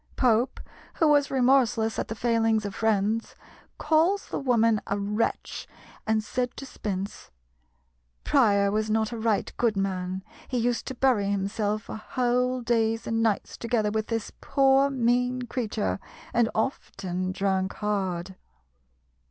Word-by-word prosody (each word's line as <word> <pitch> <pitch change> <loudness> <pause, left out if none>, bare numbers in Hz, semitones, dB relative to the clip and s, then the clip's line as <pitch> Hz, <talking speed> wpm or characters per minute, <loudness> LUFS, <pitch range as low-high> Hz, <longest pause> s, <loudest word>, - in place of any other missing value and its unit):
Pope, 245 0 +2 0.4
who 320 - +3
was 290 -2 +4
remorseless 245 -4 +2
at - - -2
the 225 - -5
failings 225 -2 +1
of 200 - -4
friends, 220 +1 0 0.4
calls 335 +6 +2
the - - -2
woman 230 -5 +3
a 200 - -1
wretch, 210 +3 -2 0.4
and 220 0 +2
said 245 +3 -3
to 275 - -6
Spence, 200 -6 -5 0.9
"Prior 200 -8 +3
was 215 +1 0
not 220 +1 +1
a 235 - -4
right 220 -2 0
good 225 -4 +1
man; 190 -1 -2 0.2
he 255 - -2
used 240 0 0
to 260 - -4
bury 240 -6 +2
himself 205 +1 -1
for - - -7
whole 250 +2 0
days 225 -1 +1
and 225 0 0
nights 220 -3 0
together 230 -3 0
with 220 0 -1
this 225 -2 -3
poor 275 0 +4
mean 250 -1 +1
creature, 230 -5 -2 0.3
and 235 -2 +3
often 185 -6 -2
drank 190 0 0
hard." 190 -3 -2
225 Hz, 140 wpm, -26 LUFS, 205-245 Hz, 0.9 s, was